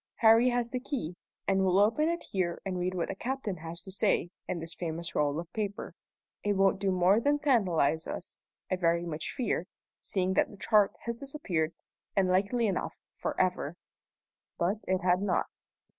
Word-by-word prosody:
Harry 230 +2 +6
has 240 -1 0
the 255 - -1
key, 245 - -4 0.3
and 195 -1 +3
we'll 185 0 +3
open 225 +11 +4
it 340 0 -2
here 175 -3 -1
and 185 -2 -2
read 180 +1 -1
what 170 - -1
the - - -1
captain 235 -2 -3
has 165 +2 -7
to 190 - -8
say 180 -2 +1 0.2
in 180 - -2
this 165 0 -5
famous 170 -1 -4
roll 150 +1 +1
of 170 0 -8
paper. 205 -2 -3 0.5
It 205 - +2
won't 195 0 +3
do 195 -1 +1
more 185 +3 +4
than 290 +5 +2
tantalize 185 - +2
us, - - -6 0.4
I 185 - +2
very 170 -1 +2
much 160 -2 -4
fear, 220 - -1 0.3
seeing 190 -1 -1
that - - +3
the 205 - -12
chart 210 -1 +4
has 235 0 -4
disappeared, 195 - -2 0.4
and 195 -2 +3
likely 200 +6 +2
enough 195 -4 -1 0.2
for - - -3
ever." 180 -4 +1 0.8
But 180 +5 +1
it 185 0 +1
had 180 +1 +3
not. 195 -3 +1
190 Hz, 185 wpm, -30 LUFS, 175-220 Hz, 0.8 s, Harry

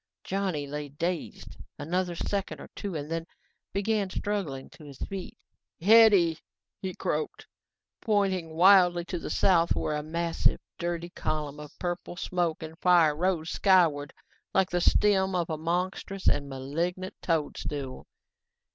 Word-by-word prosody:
Johnny 185 -7 -2
lay 145 +1 -5
dazed 170 +4 -4 0.2
another 180 +2 -1
second 200 +3 -3
or - - -10
two 200 -4 -5
and 150 +1 -5
then 165 0 -3 0.4
began 200 0 0
struggling 185 -10 -3
to - - -15
his 140 -3 -11
feet. 195 -2 -6 0.4
"Hetty," 200 -5 +6 0.4
he 185 -2 -4
croaked, 155 +1 -3 0.6
pointing 190 -7 0
wildly 175 -1 +6
to 175 0 -4
the - - -6
south 170 -3 +3
where 150 - -1
a 150 - -2
massive, 170 +2 0 0.2
dirty 175 0 -3
column 150 -3 -3
of 150 -1 -11
purple 175 0 -4
smoke 175 -3 -1
and 160 +1 -9
fire 170 -4 +5
rose 170 -1 0
skyward 165 -7 +3 0.4
like 190 -1 +3
the 175 0 +1
stem 190 0 +3
of 170 -2 -1
a 155 - -2
monstrous 180 +3 -2
and 140 -1 +2
malignant 165 +8 -3
toadstool. 145 -4 -3
175 Hz, 140 wpm, -28 LUFS, 155-190 Hz, 0.6 s, Hetty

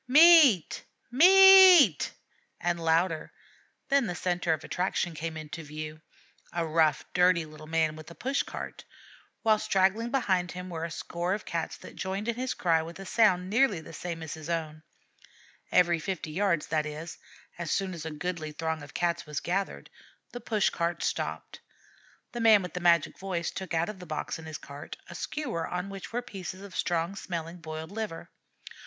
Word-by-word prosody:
"Meat! 295 - +6 0.3
Meat!" 370 - +8 0.5
and 175 -1 -1
louder; 165 0 +1 0.6
then 275 -4 +3
the 180 - -3
centre 175 -1 -1
of 160 - -1
attraction 180 -1 -1
came 160 +1 -5
in 155 -1 -7
view 155 0 -7 0.5
a 170 -1 -1
rough, 155 -1 +2
dirty 180 -2 +3
little 155 0 -12
man 160 -1 +1
with 155 +1 -11
a 170 - -12
push 270 +2 -1
cart; - - -7 0.6
while 215 -1 +4
straggling 210 +2 +1
behind 190 -9 0
him 180 0 -7
were 165 -1 -4
a 170 - -3
score 175 +3 -3
of 210 - -8
Cats 165 -1 -3
that - - -12
joined 195 +3 -4
in 235 - +1
his 255 +2 -3
cry 165 -2 +2
with 165 +1 -8
a 195 - -9
sound 185 -4 +3
nearly 220 -2 +2
the 160 +1 -12
same 165 0 -5
as 160 - -6
his 160 0 -9
own. 155 -2 -3 0.9
Every 175 -2 +4
fifty 165 -2 -4
yards, 175 -2 +1
that 155 -1 0
is, 155 +2 -7 0.4
as 170 -2 -4
soon 190 +1 -1
as 165 -3 -7
a 160 - -4
goodly 160 0 -4
throng 160 0 -3
of 145 -1 -12
Cats 170 -2 -1
was 150 0 -3
gathered, 195 +2 -3 0.4
the 245 - -7
push 215 -3 +1
cart 170 -1 -2
stopped. - - -3 0.7
The 240 - -5
man 220 -3 +6
with 180 - -7
the 180 - -3
magic 170 -3 +2
voice 185 -3 -3
took 190 -3 -5
out 165 +1 +1
of 210 -3 -7
the 180 - -10
box 155 +1 -4
in 160 - -10
his 155 -1 -6
cart 140 +1 -10
a - - -10
skewer 245 - -4
on 180 +2 -4
which 195 -1 -8
were 245 +2 -2
pieces 190 -3 -7
of 200 -2 -11
strong 170 +2 -1
smelling 170 -3 -5
boiled 160 0 -7
liver. 210 -5 -6
175 Hz, 185 wpm, -28 LUFS, 160-200 Hz, 0.9 s, Meat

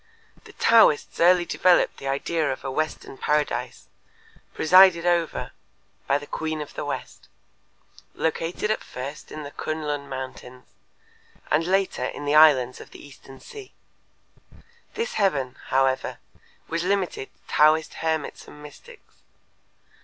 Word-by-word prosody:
The - - -14
Taoists 225 -10 +4
early 175 +1 +5
developed 180 +1 +2
the 135 - -7
idea 150 +3 -1
of 130 - -6
a 135 - -4
western 155 -2 -4
paradise 150 0 -1 0.6
presided 180 +1 +5
over 170 -2 0 0.6
by 140 - +3
the 145 - -9
Queen 155 +1 -4
of 150 - -7
the - - -5
West, - - -6 0.9
located 165 +6 -2
at 215 - -2
first 135 +4 -8
in 155 - -7
the 145 - -8
K'un 155 +1 -4
Lun 145 -1 -4
mountains 130 -1 -8 0.9
and 155 +2 +2
later 190 -8 0
in 145 - -6
the 145 - 0
islands 140 -5 +5
of - - -13
the - - -13
Eastern 135 -1 -15
Sea. 420 -3 -12 1.2
This 470 +2 -3
heaven, 135 -10 0
however, 130 0 0 0.5
was 165 +1 -2
limited 185 -7 -1
to - - -15
Taoist 155 +1 +4
hermits 160 -2 -3
and 150 - -13
mystics. 440 - -15
155 Hz, 135 wpm, -24 LUFS, 140-175 Hz, 1.2 s, early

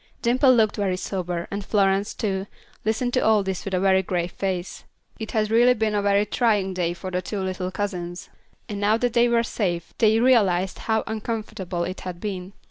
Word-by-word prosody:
Dimple 255 +3 +4
looked 220 -3 +2
very 195 -3 0
sober, 180 -3 -3
and 200 0 -3
Florence, 195 0 +1
too, 195 -2 -2 0.4
listened 225 +3 0
to 255 - +3
all 220 -3 +3
this 190 -2 -3
with 195 - -5
a - - +1
very 190 0 +4
grave 175 -1 -2
face. 190 -2 -4 0.4
It 220 - -5
had 215 -1 +1
really 240 +2 +5
been 220 -1 0
a 205 - +1
very 200 0 +3
trying 210 -4 +1
day 175 -1 -1
for 185 +1 -7
the 180 0 -1
two 205 +2 -4
little 185 -1 -3
cousins, 180 -3 -4 0.4
and 205 -1 -5
now 210 +2 +3
that 245 0 0
they 240 0 +4
were 235 0 +3
safe, 175 -8 -2
they 220 0 +4
realized 195 -7 +3
how 220 0 +2
uncomfortable 210 -5 -4
it 185 +2 -4
had 180 -2 -6
been. 190 -2 -5
200 Hz, 200 wpm, -24 LUFS, 185-220 Hz, 0.4 s, really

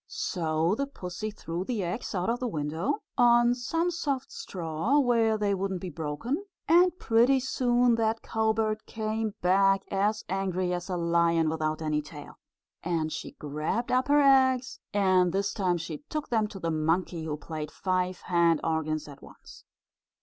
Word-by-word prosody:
So 165 0 -1
the 280 +6 -1
pussy 190 -4 -6
threw 175 -4 -5
the 215 -1 -2
eggs 180 +5 -4
out 180 0 -1
of 235 +1 0
the 255 - -2
window, 160 - -2 0.2
on 240 0 +5
some 330 +8 -1
soft 280 -6 -3
straw, 170 - -2
where 230 -5 +3
they 205 -1 +1
wouldn't 190 -1 -2
be 180 0 -6
broken, 165 - -3 0.2
and 355 +2 +5
pretty 240 +2 +3
soon 245 -2 +2
that 225 0 0
cowbird 220 -1 0
came 220 -1 -3
back, 195 +1 +4
as 205 +2 0
angry 185 -1 -1
as 175 +1 -4
a 180 - -1
lion 170 -1 +2
without 155 0 -2
any 150 -1 0
tail. 150 0 -11 0.4
And 165 -2 -1
she - - -6
grabbed 150 +11 -3
up 255 +2 +2
her 290 0 +5
eggs, 260 -2 +3
and 185 -3 +3
this 200 +2 -1
time 185 -4 0
she 165 - -6
took 305 -1 -4
them 220 -3 +1
to 210 - -10
the 165 -3 -2
monkey, 160 +1 0
who 150 -1 -3
played 155 0 -6
five 185 0 -2
hand 170 -3 +2
organs 155 -1 -1
at 140 -1 -12
once. - - -15
195 Hz, 165 wpm, -28 LUFS, 165-235 Hz, 0.4 s, on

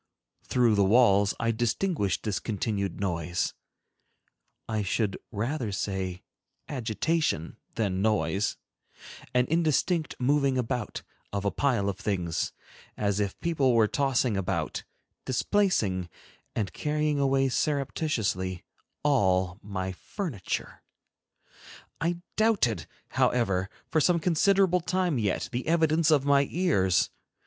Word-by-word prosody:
Through 120 -3 +2
the 100 -1 +4
walls 100 -1 +4
I 115 0 +1
distinguished 115 - 0
this 105 -4 -1
continued 100 -3 -2
noise,—I 90 +4 -5
should 100 0 0 0.2
rather 120 +2 -2
say 95 -2 -3 0.4
agitation 125 - -1 0.2
than 95 -4 0
noise,—an 105 +5 -2
indistinct 165 0 +1
moving 140 +1 +2
about 125 -3 -2 0.3
of 100 0 -3
a 100 - +2
pile 120 -8 +1
of 100 -1 -2
things, 90 -5 -1 0.5
as 100 -1 0
if 100 -2 -2
people 145 -7 +2
were 110 -2 +5
tossing 130 -3 +1
about, 95 -2 -2 0.4
displacing, 115 - +1 0.5
and 105 -4 -2
carrying 150 -1 0
away 135 -1 +3
surreptitiously 125 - -1 0.4
all 95 -9 +2
my 95 -2 -4
furniture. 125 - -5 1.2
I 170 +2 -1 0.2
doubted, 195 - +2 0.2
however, 95 -6 +1 0.2
for 160 - +3
some 175 +2 +3
considerable 180 +2 +3
time 180 -4 0
yet, 100 -4 -1
the 125 +2 -3
evidence 160 -1 +3
of 145 -3 +4
my 140 -1 +4
ears. 100 - +2
115 Hz, 105 wpm, -28 LUFS, 100-150 Hz, 1.2 s, were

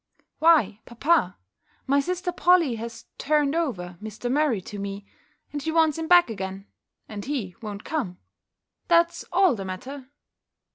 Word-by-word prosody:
"Why, 290 - +4
papa, 240 - +1 0.5
my 280 +1 +3
sister 360 +4 -2
Polly 350 -6 +4
has 230 +1 -7
turned 295 -1 +2
over 180 - -3
Mr. 220 +3 -5
Murray 285 -6 +2
to 205 +3 -8
me, 200 0 -5 0.5
and 290 - -3
she 320 - -2
wants 320 -1 +3
him 325 - -3
back 350 -2 +7
again, 195 -3 -6 0.4
and 205 -2 -7
he 250 -11 -3
won't 210 -2 -6
come 250 - -3 0.7
That's 340 0 +3
all 365 -3 +4
the 200 -4 -5
matter!" 255 +9 -7
265 Hz, 145 wpm, -25 LUFS, 205-320 Hz, 0.7 s, back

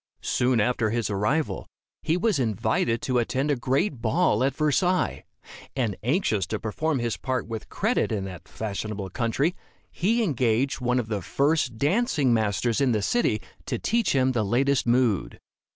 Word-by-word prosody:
Soon 125 -1 +2
after 110 +1 +1
his 115 -2 -1
arrival, 120 +11 -1 0.3
he 165 - +1
was 195 -4 +1
invited 115 0 0
to 125 -2 +1
attend 135 +5 0
a - - +2
great 135 - 0
ball 110 0 +2
at 135 -1 +1
Versailles; 175 +5 +1 0.5
and 115 -7 0
anxious 115 - +1
to 110 - -3
perform 150 +8 -1
his 120 -2 -2
part 130 -2 -2
with 115 -2 -6
credit 220 - 0
in 100 -3 -2
that 90 -4 -9
fashionable 105 -2 -5
country, 135 - 0 0.4
he 225 +6 +1
engaged 130 - +1
one 125 0 +1
of 120 -3 -1
the 105 -3 -2
first 140 - 0
dancing 150 - +2
masters 110 +2 +1
in 130 -3 +3
the 105 -2 0
city 110 - +1 0.2
to - - -1
teach 230 -2 +1
him 130 -1 +3
the 120 -3 0
latest 130 +6 +1
mode. 120 -4 +1
125 Hz, 165 wpm, -25 LUFS, 110-145 Hz, 0.5 s, in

